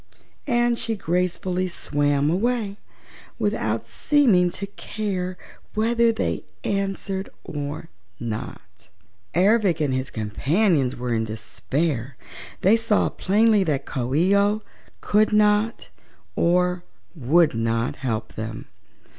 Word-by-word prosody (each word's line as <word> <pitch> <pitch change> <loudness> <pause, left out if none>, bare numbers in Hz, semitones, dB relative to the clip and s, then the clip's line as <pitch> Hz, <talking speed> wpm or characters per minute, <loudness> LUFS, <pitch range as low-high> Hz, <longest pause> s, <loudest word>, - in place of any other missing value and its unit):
And 240 -1 +2
she 225 - -2
gracefully 180 0 -1
swam 145 -3 0
away, 210 +1 0 0.6
without - - -1
seeming 230 - +3
to 200 - -5
care 195 -3 -4 0.4
whether 230 +2 +3
they 225 - -2 0.2
answered 195 -1 -2
or 145 -1 -5 0.3
not. 115 -6 -7 0.5
Ervic 195 -1 +3
and 145 -4 +1
his 130 +1 -2
companions 135 - +1
were 125 -1 -2
in 115 0 0
despair. 120 +5 -3 0.4
They 205 +5 +5
saw 225 -2 +2
plainly 210 +1 +3
that 145 -4 -1
Coo 130 -1 -2
ee 180 +6 +4
oh 205 +2 +2 0.4
could 215 +1 +3
not 210 +2 +2 0.5
or 180 +1 +2 0.3
would 155 +3 +3
not 115 +1 -1
help 115 -5 -3
them. 110 +1 -6
180 Hz, 110 wpm, -23 LUFS, 135-210 Hz, 0.6 s, They